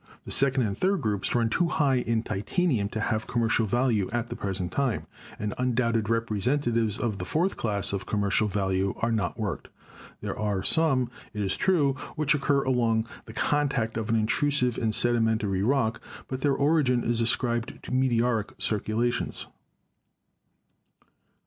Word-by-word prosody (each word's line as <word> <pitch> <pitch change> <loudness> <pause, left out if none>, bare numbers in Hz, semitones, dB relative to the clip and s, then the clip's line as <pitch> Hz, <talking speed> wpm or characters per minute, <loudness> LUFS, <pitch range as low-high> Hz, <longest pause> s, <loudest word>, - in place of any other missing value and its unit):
The - - -7
second 135 -1 +3
and 100 -3 -1
third 190 - +1
groups 105 -1 -1
run 115 -1 +3
too 170 +10 +1
high 145 -6 +2
in 115 -2 0
titanium 110 - 0
to 110 - -4
have 110 0 -1
commercial 115 -1 +1
value 115 -3 +1
at 120 +1 -2
the - - -4
pres 95 -1 -3
ent 90 -1 -3
time, 135 -2 -1 0.3
and 105 -1 -3
undoubted 115 -3 +1
representatives 115 0 0
of 110 -4 -2
the - - -3
fourth 165 - 0
class 100 -3 0
of 100 - -3
commercial 105 +1 +1
value 95 -1 0
are 115 - 0
not 110 -2 -1
worked. 105 -6 -3 0.5
There - - -4
are 105 -3 -1
some, 135 -6 +2 0.2
it 105 - -1
is 95 - -1
true, 155 -8 +2 0.2
which 155 0 +2
occur 140 -1 +1
along 115 -4 +1 0.2
the 110 - -9
contact 140 -5 0
of 110 -1 -3
an 115 - +2
in 110 -1 +2
trusive 125 0 +1
and 110 -2 0
sedimentary 110 -5 +1
rock, 115 0 +1 0.3
but 130 0 -5
their 140 -1 +2
origin 140 -4 +2
is 120 0 0
ascribed 120 +2 0
to - - -6
meteoric 120 -4 +1
circulations. 110 +3 -1
115 Hz, 160 wpm, -27 LUFS, 105-130 Hz, 0.5 s, second